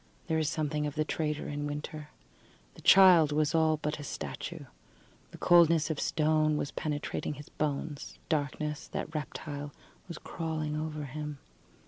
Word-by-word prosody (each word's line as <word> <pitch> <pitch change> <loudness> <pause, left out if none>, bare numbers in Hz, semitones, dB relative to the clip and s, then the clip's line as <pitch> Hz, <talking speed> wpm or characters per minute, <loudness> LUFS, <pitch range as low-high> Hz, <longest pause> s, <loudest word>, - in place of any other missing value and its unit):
There 160 0 +1
is 155 -2 +1
something 150 -2 -1
of 145 - -5
the 155 0 +1
traitor 150 -1 -2
in 145 0 -3
winter. 150 +1 -6 0.6
The - - -14
child 180 -5 +7
was 150 0 +1
all 160 -1 +3
but 150 0 -3
a - - -6
statue. 155 +2 -6 0.6
The - - -12
coldness 170 -2 +5
of 155 - -3
stone 155 -1 +2
was 145 - -2
penetrating 150 0 -3
his 145 +1 -11
bones; 150 0 -3
darkness, 150 -1 -2
that 160 - -5
reptile, 145 -1 -5 0.4
was 170 -3 -7
crawling 155 -2 -3
over 155 -1 -3
him. 150 +1 -5
150 Hz, 150 wpm, -30 LUFS, 150-160 Hz, 0.6 s, child